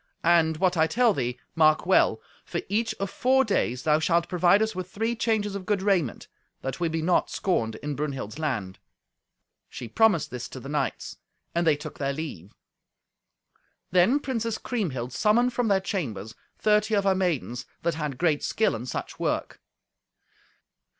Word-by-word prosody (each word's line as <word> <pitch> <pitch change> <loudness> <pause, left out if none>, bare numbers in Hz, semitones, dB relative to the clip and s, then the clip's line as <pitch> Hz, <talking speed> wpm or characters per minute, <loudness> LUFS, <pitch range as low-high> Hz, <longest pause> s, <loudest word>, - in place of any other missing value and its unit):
And 165 -2 +4
what 180 0 +1
I 160 0 +4
tell 230 +6 +3
thee, 125 -5 -2 0.2
mark 155 -1 +4
well. 190 - +3 0.2
For - - -3
each 225 +3 0
of 195 0 -4
four 265 +1 +3
days 125 - 0
thou 155 0 +3
shalt 170 +1 +2
provide 180 +3 +4
us 220 - -2
with 185 0 -5
three 225 +4 -1
changes 220 -3 0
of 195 -2 -6
good 205 -3 0
raiment, 185 - 0 0.4
that 135 +3 -4
we 170 -1 0
be 160 0 -2
not 180 +2 +2
scorned 115 - -1
in 150 0 -2
Brunhild's 140 -5 -4
land!" 110 -12 -3 0.9
She 120 - -7
promised 210 - +2
this 125 -1 -6
to 130 - -8
the 135 - -9
knights, 150 0 -2 0.4
and 170 0 +1
they 155 - +5
took 150 +1 -9
their 140 -1 -1
leave. 135 - -7 1.4
Then 185 +11 +4
Princess 230 -5 -2
Kriemhild 130 - -3
summoned 230 - +3
from 245 -1 0
their 200 -2 +3
chambers 135 - -4 0.2
thirty 210 0 +2
of 200 - +2
her 195 -1 +3
maidens 165 -10 -2 0.2
that 170 0 +1
had 150 -4 -4
great 155 -1 +1
skill 220 - +1
in 120 +3 -6
such - - -5
work. - - -2
170 Hz, 170 wpm, -26 LUFS, 140-205 Hz, 1.4 s, they